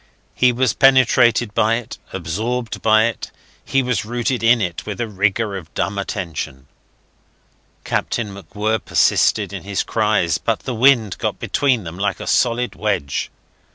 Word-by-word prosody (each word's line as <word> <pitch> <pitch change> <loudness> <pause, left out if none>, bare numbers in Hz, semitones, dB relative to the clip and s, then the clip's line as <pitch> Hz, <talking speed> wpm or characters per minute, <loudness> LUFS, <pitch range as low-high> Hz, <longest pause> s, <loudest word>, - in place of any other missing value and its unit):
He 125 0 +3
was 125 -1 +1
penetrated 120 -4 +4
by 110 +2 +2
it, 120 0 -6
absorbed 110 +8 -3
by 110 0 +4
it; 115 -2 -4 0.3
he 135 0 +1
was 125 -7 -1
rooted 120 +3 -2
in 115 +1 +4
it 90 -5 -3
with 105 -3 -6
a 120 - -1
rigour 105 +1 0
of 85 -4 -8
dumb 100 +1 -1
attention. 85 -9 -5 1.2
Captain 105 -4 -2
MacWhirr 105 +3 -3
persisted - - +2
in - - -5
his 100 -1 -2
cries, 105 -6 +1
but - - -1
the 130 - -4
wind 115 -5 +3
got - - -2
between 130 -6 0
them 85 +1 -8
like 100 0 -1
a - - -6
solid 120 0 +1
wedge. 100 -10 -2
110 Hz, 155 wpm, -20 LUFS, 100-120 Hz, 1.2 s, penetrated